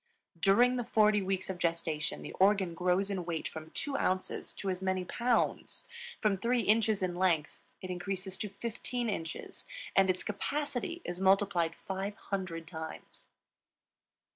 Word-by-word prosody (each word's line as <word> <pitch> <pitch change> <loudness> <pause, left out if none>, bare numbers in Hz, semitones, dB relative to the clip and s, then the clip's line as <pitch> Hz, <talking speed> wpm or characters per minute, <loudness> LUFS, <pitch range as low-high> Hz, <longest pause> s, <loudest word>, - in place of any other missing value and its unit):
During 240 +8 +5
the 245 - 0
forty 215 -2 +4
weeks 190 0 -1
of 190 -2 -4
gestation 165 -3 -1
the - - -6
organ 190 -2 +4
grows 180 +3 +1
in 190 -3 -1
weight 170 -2 -2
from 160 0 -8
two 280 - -2
ounces 185 -6 0
to 195 - -2
as 185 0 -4
many 185 -1 0
pounds; 240 +5 0 0.3
from 210 -3 +2
three 235 +4 +2
inches 215 -1 +3
in 180 -1 0
length 175 -4 +1 0.2
it 185 - -4
increases 190 +1 -3
to 210 - -2
fifteen 235 +3 -3
inches; 165 -5 -5 0.3
and 195 -1 +5
its 185 0 +1
capacity 290 - -2
is 175 0 -4
multiplied 190 -3 +3
500 190 -3 -4
times. 160 -2 -8
190 Hz, 145 wpm, -32 LUFS, 180-210 Hz, 0.3 s, During